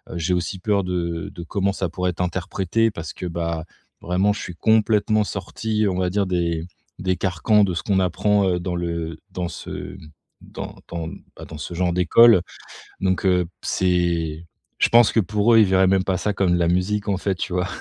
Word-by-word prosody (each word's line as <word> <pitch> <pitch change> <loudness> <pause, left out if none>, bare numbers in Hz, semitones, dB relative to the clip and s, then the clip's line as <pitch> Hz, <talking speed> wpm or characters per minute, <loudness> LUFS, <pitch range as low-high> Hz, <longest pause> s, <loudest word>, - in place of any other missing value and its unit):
j'ai 85 +2 -1
aussi 90 +2 -3
peur 100 0 +1
de 85 -3 -3
de 85 - -8
comment 100 +3 -1
ça 95 - -2
pourrait 90 +1 -2
être 90 - -6
interprété 95 +5 0
parce 85 -6 -7
que, 90 - -7
bah 85 -1 -3 0.4
vraiment, 95 +4 +1
je - - -6
suis 90 - -6
complètement 110 +1 +2
sorti 105 +2 -2
on 90 - -2
va 90 -1 0
dire 100 0 +1
des 85 -2 -1 0.3
des 90 0 0
carcans 100 +3 +2
de 90 - -2
ce - - -3
qu'on 95 -2 +1
apprend 95 0 +1
dans 90 0 -3
le 85 -2 -3
dans 90 -1 -3
ce - - -7 0.4
dans - - -8
dans, 85 -2 -4 0.3
bah - - -9
dans 80 - -9
ce 80 - -6
genre 90 -1 0
d'école. 100 +3 +6 0.6
Donc 95 0 0
heu, 90 -2 +3 0.2
c'est 85 -3 0 0.3
je - - +3
pense 120 -2 +6
que - - +1
pour 105 +4 +2
eux, - - +7
ils - - +7
verraient 95 0 +4
même 95 0 +2
pas 95 -1 0
ça 105 +2 -1
comme 90 -3 +2
la 85 -1 +1
musique, 100 +4 0
en 100 - +1
fait. 95 -1 -1
Tu 90 - -4
vois? 90 0 0
90 Hz, 200 wpm, -22 LUFS, 85-100 Hz, 0.6 s, eux